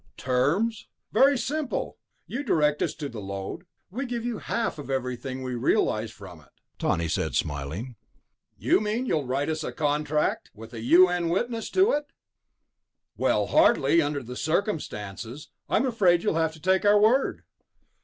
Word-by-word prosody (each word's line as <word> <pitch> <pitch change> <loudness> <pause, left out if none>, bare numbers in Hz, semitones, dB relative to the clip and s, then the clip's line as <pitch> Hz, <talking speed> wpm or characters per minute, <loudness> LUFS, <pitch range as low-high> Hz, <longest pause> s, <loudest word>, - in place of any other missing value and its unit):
"Terms? 155 - 0 0.2
Very 275 +5 +5
simple. 280 +3 -3 0.3
You 255 - -4
direct 150 - +1
us - - -1
to 145 -1 -5
the 115 -6 -7
lode, 100 - -6 0.2
we 260 +6 -4
give 240 -1 -4
you 240 -3 -3
half 230 -8 -2
of 145 - -8
everything 130 0 -3
we 130 -1 -4
realize 115 -3 +1
from 95 -6 -12
it," 70 - -23 0.3
Tawney 85 0 0
said, - - -1
smiling. 80 - -3 0.6
"You - - +3
mean 215 +4 -1
you'll 150 - -1
write 135 +3 -1
us 160 0 -2
a - - -3
contract? 150 0 0
With 115 +2 -11
a 115 - -6
U.N. 175 +6 +4
witness 225 +6 -1
to 385 +4 +4
it?" 290 0 -1 1.1
"Well, - - +1
hardly... 165 - +4
under 145 -2 -2
the 125 +1 -8
circumstances. 145 - -3 0.2
I'm 245 - +2
afraid 190 -9 +3
you'll 210 - +1
have 160 -1 0
to 160 - -13
take 190 +4 +2
our 205 0 +5
word." 235 +6 +2
155 Hz, 160 wpm, -26 LUFS, -, 1.1 s, Very